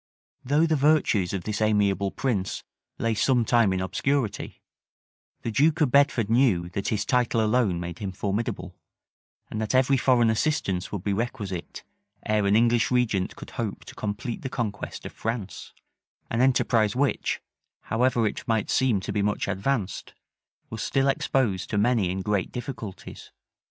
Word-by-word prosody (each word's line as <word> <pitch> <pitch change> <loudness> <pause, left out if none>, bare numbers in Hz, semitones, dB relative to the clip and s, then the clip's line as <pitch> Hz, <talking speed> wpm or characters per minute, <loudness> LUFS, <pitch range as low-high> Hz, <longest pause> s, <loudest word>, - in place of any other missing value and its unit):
Though 145 +5 +3
the 160 -1 +2
virtues 140 - +2
of 95 -3 -3
this 105 +1 -3
amiable 100 -2 +2
prince 105 -5 -2 0.3
lay 115 -1 0
some 120 +2 +2
time 115 -3 +3
in 95 - 0
obscurity, 115 +4 -2 0.8
the 115 - -2
duke 150 +7 +3
of 150 -6 +2
Bedford 140 -6 +3
knew 110 -7 +2
that 100 +2 -4
his 105 -1 0
title 125 -2 +1
alone 110 -5 +2
made 85 -1 -6
him 100 -2 -4
formidable, 100 -1 -3 0.8
and 110 - -3
that 110 +3 -1
every 130 +1 +4
foreign 120 -3 +3
assistance 105 -7 -1
would 100 -4 -4
be 100 - 0
requisite, 100 -5 -4 0.4
ere 105 -1 +1
an 100 - +3
English 115 +1 +3
regent 115 -7 0
could - - -10
hope 105 -4 -5
to - - -10
complete 105 +3 -4
the 130 - -4
conquest 110 -5 -4
of - - -6
France; 110 -3 -5 0.6
an 115 - +1
enterprise 120 -5 +3
which, 140 +1 0 0.4
however 120 0 +1
it 105 - -3
might 110 -3 0
seem 130 -6 +2
to - - -4
be 105 - 0
much 105 +1 0
advanced, 100 +1 -2 0.6
was 110 -1 -5
still 135 0 +1
exposed 115 -9 0
to 105 - -1
many 105 -3 +2
and 95 +1 -3
great 105 -2 -1
difficulties. 120 -6 -7
110 Hz, 160 wpm, -26 LUFS, 100-125 Hz, 0.8 s, every